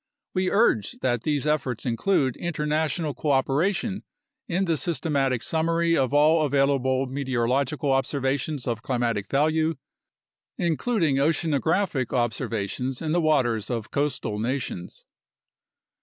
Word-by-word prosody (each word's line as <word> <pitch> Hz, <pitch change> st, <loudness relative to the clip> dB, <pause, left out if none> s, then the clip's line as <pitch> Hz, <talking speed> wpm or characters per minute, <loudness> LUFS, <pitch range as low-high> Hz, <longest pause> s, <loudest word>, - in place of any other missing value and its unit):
We 185 Hz, -1 st, +1 dB
urge 200 Hz, -, +2 dB
that 120 Hz, -3 st, 0 dB
these 145 Hz, +1 st, -1 dB
efforts 145 Hz, -6 st, -1 dB
include 130 Hz, +2 st, +1 dB
international 155 Hz, -1 st, -1 dB
cooperation 160 Hz, -, 0 dB, 0.4 s
in 185 Hz, +2 st, 0 dB
the 165 Hz, -2 st, +1 dB
systematic 140 Hz, -6 st, 0 dB
summary 165 Hz, +1 st, +1 dB
of 130 Hz, -3 st, +1 dB
all 155 Hz, +2 st, +4 dB
available 135 Hz, -2 st, +2 dB
meteorological 135 Hz, +2 st, -1 dB
observations 135 Hz, +1 st, -1 dB
of 115 Hz, -2 st, -2 dB
climatic 120 Hz, -5 st, -1 dB
value, 155 Hz, +3 st, +2 dB, 0.8 s
including 170 Hz, -, +1 dB
oceanographic 155 Hz, -, +1 dB
observations 120 Hz, +1 st, -1 dB
in 155 Hz, -1 st, -2 dB
the 175 Hz, +2 st, +2 dB
waters 125 Hz, -9 st, +1 dB
of 115 Hz, -3 st, -4 dB
coastal 130 Hz, -7 st, -1 dB
nations. 115 Hz, -7 st, -4 dB
140 Hz, 110 wpm, -25 LUFS, 125-160 Hz, 0.8 s, all